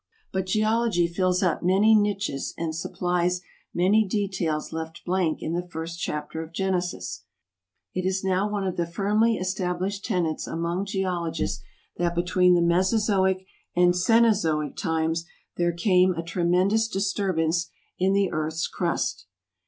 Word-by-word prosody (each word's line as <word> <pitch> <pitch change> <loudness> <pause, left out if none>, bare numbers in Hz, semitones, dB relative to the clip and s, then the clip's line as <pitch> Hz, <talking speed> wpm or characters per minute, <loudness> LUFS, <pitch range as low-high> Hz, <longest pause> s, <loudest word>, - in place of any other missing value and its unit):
But 190 -1 -1
Geology 215 -2 +2
fills 180 +2 +1
up 175 -4 +1
many 195 +5 +4
niches 200 -9 0
and 160 -1 -3
supplies 180 +1 -1 0.3
many 195 +5 +3
details 190 -6 -2
left 160 +1 -6
blank 180 -3 0
in 160 - -2
the 175 +1 -2
first 165 0 -6
chapter 150 +1 -3
of 160 0 -8
Genesis. 180 - -2 0.7
It 185 - -2
is 190 +1 -1
now 190 +2 +1
one 205 -1 -2
of 185 - -2
the 170 -1 0
firmly 210 +6 +2
established 185 +1 -2
tenets 175 -8 -1
among 170 +3 -2
geologists 170 - -2 0.4
that 175 0 0
between 180 +1 +3
the 170 - +3
Mesozoic 190 +1 +2 0.3
and 175 0 +5
Cenozoic 180 - +2
times 165 -1 -1 0.3
there 175 0 +2
came 180 +1 +3
a 165 - -3
tremendous 180 +6 +2
disturbance 190 -5 0 0.3
in 190 +1 +3
the 200 -1 +2
earth's 155 +1 -1
crust. 170 - -2
180 Hz, 135 wpm, -25 LUFS, 170-195 Hz, 0.7 s, and